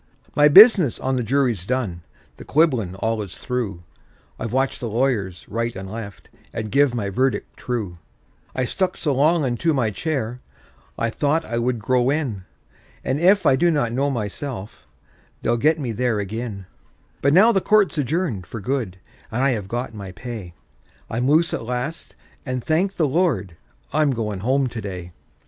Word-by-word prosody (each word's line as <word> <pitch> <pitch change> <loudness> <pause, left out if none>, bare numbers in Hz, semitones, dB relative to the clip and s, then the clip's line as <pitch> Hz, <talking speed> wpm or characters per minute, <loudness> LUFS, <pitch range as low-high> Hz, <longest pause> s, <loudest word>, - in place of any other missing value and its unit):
My 145 0 +6
business 190 - +8
on 130 0 -1
the 125 - 0
jury's 120 -5 +1
done—the 90 - -5
quibblin' 130 - +2
all 110 +2 -1
is 95 -4 -7
through— 115 -8 -3 0.6
I've 115 - -4
watched 135 +2 0
the 120 - -4
lawyers 110 -6 -1
right 115 +2 -2
and 95 0 -6
left, 100 -2 -8 0.2
and 110 -2 -5
give 140 -3 +3
my 100 -4 -2
verdict 130 +5 -1
true; 115 -8 -3 0.6
I 130 - 0
stuck 185 +8 -1
so 150 -4 0
long 150 +3 +3
unto 140 +6 0
my 115 -5 +1
chair, 125 - -3 0.6
I 115 - 0
thought 150 +6 0
I 115 - -2
would 120 +1 0
grow 125 +3 +1
in; 130 -11 -2 0.6
And 130 +3 -1
if 190 +4 +4
I 130 - +6
do 175 +6 +3
not 145 -8 +1
know 140 +3 +1
myself, 115 -2 -5 0.6
they'll 120 - +2
get 155 +6 +2
me 130 -5 -2
there 115 -1 0
ag'in; 105 -1 -5 0.6
But 140 - +3
now 215 +6 +7
the 195 -4 +2
court's 210 -3 +3
adjourned 140 - -1
for 115 - -6
good, 110 -4 -2 0.3
and 125 +4 -1
I 135 - +4
have 105 -6 -3
got 120 +2 -3
my 100 -3 -8
pay; 105 -6 -7 0.6
I'm 125 +4 0
loose 165 +3 +3
at - - -2
last, 125 +7 -4 0.3
and 130 -2 -3
thank 185 +5 +1
the 155 - +2
Lord, 130 - 0 0.4
I'm 155 -1 +3
going 110 -6 -2
home 130 +6 +1
to 120 -2 -4
day. 90 -3 -6
125 Hz, 170 wpm, -22 LUFS, 110-145 Hz, 0.6 s, business